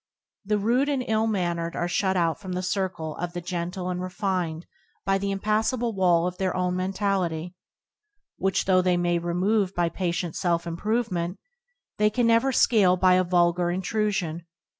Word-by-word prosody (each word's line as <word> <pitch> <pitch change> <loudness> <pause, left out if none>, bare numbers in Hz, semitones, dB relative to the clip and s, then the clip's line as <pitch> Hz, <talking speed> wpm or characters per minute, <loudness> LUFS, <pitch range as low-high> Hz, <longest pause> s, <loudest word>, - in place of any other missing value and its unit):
The 210 +1 0
rude 240 +7 +1
and 270 -3 -1
ill 220 0 +1
mannered 175 -5 -1
are 175 - -1
shut 190 +1 0
out 165 0 0
from 185 -2 -5
the 180 +1 -2
circle 180 -4 -2
of 175 0 -4
the 175 - -3
gentle 180 +1 -4
and 180 0 -3
refined 180 -3 -2 0.4
by 195 0 +2
the 200 +1 -2
impassable 220 +4 0
wall 175 -3 +3
of 180 0 -4
their 190 -1 0
own 180 0 0
mentality 185 -3 -1 0.8
which, 195 0 0
though 185 -1 +4
they 180 -1 +2
may 175 0 +1
remove 185 +3 0
by 175 -1 +1
patient 175 -2 -2
self 170 -2 0
improvement, 180 0 -2 0.6
they 210 0 +4
can 240 +3 0
never 230 +3 +3
scale 200 -7 +4
by 185 0 +4
a 185 0 +4
vulgar 175 0 +2
intrusion. 185 -3 -2
185 Hz, 165 wpm, -25 LUFS, 175-205 Hz, 0.8 s, though